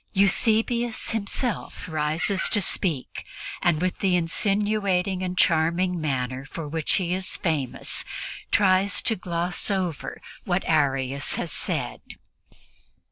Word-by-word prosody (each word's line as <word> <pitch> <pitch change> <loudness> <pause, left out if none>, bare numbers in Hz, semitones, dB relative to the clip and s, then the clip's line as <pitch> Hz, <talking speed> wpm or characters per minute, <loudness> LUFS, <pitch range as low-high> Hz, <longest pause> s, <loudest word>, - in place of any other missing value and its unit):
Eusebius 225 +4 +2
himself 225 -1 -2
rises 160 +5 +1
to 215 - +3
speak 170 -7 -1 0.4
and, 170 -3 +2
with 185 - -1
the 190 -2 +2
insinuating 195 +1 +1
and 185 0 -3
charming 170 +2 +2
manner 130 -3 -2
for 150 +3 -7
which 155 0 -1
he 180 -2 +1
is 185 0 -1
famous, 155 -9 0 0.5
tries 190 -1 +3
to 225 - +2
gloss 175 0 -1
over 185 -6 -2 0.2
what 180 0 0
Arius 135 -3 +1
has - - -3
said. - - -1
180 Hz, 115 wpm, -25 LUFS, 160-200 Hz, 0.5 s, to